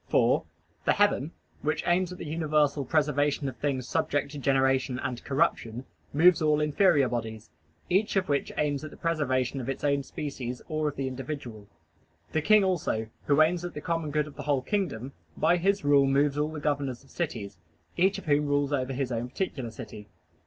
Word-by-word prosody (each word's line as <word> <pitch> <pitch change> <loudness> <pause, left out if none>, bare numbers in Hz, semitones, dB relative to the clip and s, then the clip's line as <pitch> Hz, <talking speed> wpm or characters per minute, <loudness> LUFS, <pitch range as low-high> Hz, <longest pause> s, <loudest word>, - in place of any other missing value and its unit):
For - - +3 0.4
the - - +3
heaven, 185 -7 +2 0.3
which 155 - -1
aims 180 +1 +2
at 180 - -7
the - - -7
universal 150 -2 +1
preservation 145 -1 +1
of 130 - -4
things 130 -2 -2
subject 145 -1 0
to 145 - -6
generation 135 -1 +2
and 125 -2 -4
corruption, 125 -2 0 0.3
moves 165 +3 +5
all 150 -1 +3
inferior 150 -1 +3
bodies, 110 -5 -5 0.4
each 195 +4 +1
of 190 -1 +1
which 140 -1 0
aims 145 -1 0
at 155 - -6
the - - -14
preservation 135 -5 0
of 125 - -5
its 135 - -4
own 140 -1 +2
species 130 -3 -5
or 155 -1 -1
of 145 - -3
the 135 -1 -2
individual. 130 -5 -6 0.6
The 160 - +1
king 215 +5 +5
also, 150 -12 -1 0.2
who 145 +2 +6
aims 175 +2 0
at 175 - -6
the - - -3
common 165 -2 -2
good 150 0 +1
of 150 - -12
the - - -5
whole 140 -2 0
kingdom, 140 - -2 0.2
by 170 +3 +3
his 195 +1 +1
rule 140 -1 +5
moves 140 +1 +2
all 150 +1 0
the 155 - -5
governors 140 -4 -2
of 135 - -21
cities, 105 - -4 0.4
each 190 +3 +3
of 195 - -9
whom 145 -1 +2
rules 145 0 +1
over 135 -1 -1
his 130 -1 -2
own 120 +1 -2
particular 130 -5 -3
city. 105 -1 -9
145 Hz, 195 wpm, -28 LUFS, 130-155 Hz, 0.6 s, who